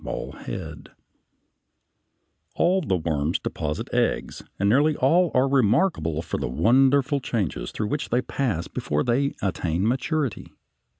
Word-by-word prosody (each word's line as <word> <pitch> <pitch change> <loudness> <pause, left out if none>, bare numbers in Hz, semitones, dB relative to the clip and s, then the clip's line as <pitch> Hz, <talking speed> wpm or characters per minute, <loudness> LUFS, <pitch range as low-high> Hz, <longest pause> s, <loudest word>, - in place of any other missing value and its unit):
] - - -13
All - - -5 2.5
the 95 - 0
worms 80 -1 -1
deposit 75 0 -4
eggs, - - 0 0.2
and 100 - +1
nearly 145 +8 +3
all 170 +7 +3
are 130 +1 +4
remarkable 110 - +1
for 85 - -4
the - - -2
wonderful 135 - +3
changes 95 - -2
through 105 -1 -3
which 145 - -2
they 125 +2 +1
pass 110 -12 -2
before 75 0 -2
they 135 +4 0
attain 90 0 -1
maturity. 135 +1 -2
120 Hz, 125 wpm, -24 LUFS, 85-140 Hz, 2.5 s, are